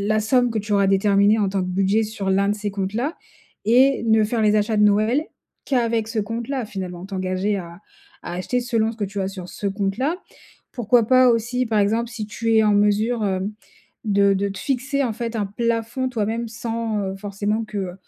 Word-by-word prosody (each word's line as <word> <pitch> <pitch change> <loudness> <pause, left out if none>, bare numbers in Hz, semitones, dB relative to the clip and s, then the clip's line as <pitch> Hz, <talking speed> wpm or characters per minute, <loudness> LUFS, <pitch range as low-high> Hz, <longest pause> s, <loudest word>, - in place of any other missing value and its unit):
la - - +3
somme 245 +3 +2
que 225 - -1
tu 210 0 -3
auras 200 -1 +3
déterminée 200 +2 +4
en 205 - +2
tant 195 0 -1
que 180 - -3
budget 195 +4 +2
sur 210 -2 -4
l'un 195 +1 +2
de 205 - +1
ces 210 0 -3
comptes-là 210 - -2 0.5
et 255 +4 +4
ne 220 -1 +4
faire 225 +1 -1
les 210 -1 +3
achats 215 +1 0
de 210 - +4
Noël 215 +7 +3 0.4
qu'avec 230 -4 0
ce 225 - -1
compte-là 230 +4 -3
finalement? 185 -3 -6
T'engager 190 +1 -1
à 170 -1 -8 0.4
à - - -6
acheter 185 +7 -1
selon 230 -2 0
ce 230 - -13
que 215 - -2
tu 200 0 -4
as 190 - -1
sur 185 -2 -8
ce 205 - -4
compte 195 0 -2
là. 290 +7 0 0.6
Pourquoi 235 -2 +2
pas, 255 0 +6
aussi 240 +2 0
par 220 -2 +1
exemple 225 +3 +1
si 225 -2 -5
tu 225 +1 -1
es 220 - +5
en 210 -1 +3
mesure 210 +3 +2
hem 190 +1 -2 0.5
de 200 -2 +3
de 195 +1 0
te 195 - -7
fixer 275 +4 -1
en 240 -4 -1
fait 235 +1 -4
un 210 -2 0
plafond 230 +4 -2
toi-même, 230 0 -2
sans, 225 -1 -3
heu, 190 -1 -3
forcément 205 +2 -2
que, 215 - -7
heu, 185 -3 -3
215 Hz, 210 wpm, -22 LUFS, 200-230 Hz, 0.6 s, pas